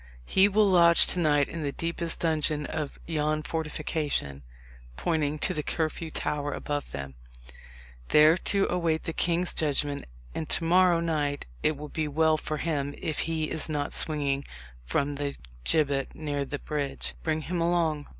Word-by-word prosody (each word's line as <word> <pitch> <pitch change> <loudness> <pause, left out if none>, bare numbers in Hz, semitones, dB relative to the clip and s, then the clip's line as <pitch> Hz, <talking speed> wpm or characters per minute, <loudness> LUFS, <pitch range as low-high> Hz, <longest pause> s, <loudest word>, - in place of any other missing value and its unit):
He 190 - +5
will 210 +1 +3
lodge 170 -3 +7
to 180 - -1
night 145 -4 +3
in 165 - -6
the 145 -2 -1
deepest 170 +1 -3
dungeon 155 -2 +1
of 150 -2 -4
yon 155 -1 -1
fortification," 150 - -2 0.6
pointing 150 - 0
to - - 0
the 150 - -2
Curfew 160 +1 -2
Tower 145 -2 -2
above 145 -1 -3
them, 70 -1 -6 0.9
"there 155 - +6
to 195 +2 +1
await 170 -3 0
the 165 - -4
king's 175 +2 +1
judgment; 145 -1 -1 0.3
and 155 - -4
to - - +2
morrow 175 0 +4
night 150 -4 -1 0.2
it 155 -1 +1
will 150 +1 -7
be 155 0 -2
well 155 +1 +2
for 155 0 -4
him 145 -3 -2
if 155 - -3
he 160 -1 -1
is 160 0 -1
not 145 -2 -2
swinging 140 -3 0 0.4
from 140 - 0
the 145 -1 -3 0.3
gibbet 140 -4 +1
near 145 -2 -3
the 145 - -4
bridge. 145 -2 -1
Bring 160 -1 -1
him 170 +2 -3
along." 165 -3 +1
155 Hz, 160 wpm, -27 LUFS, 145-165 Hz, 0.9 s, lodge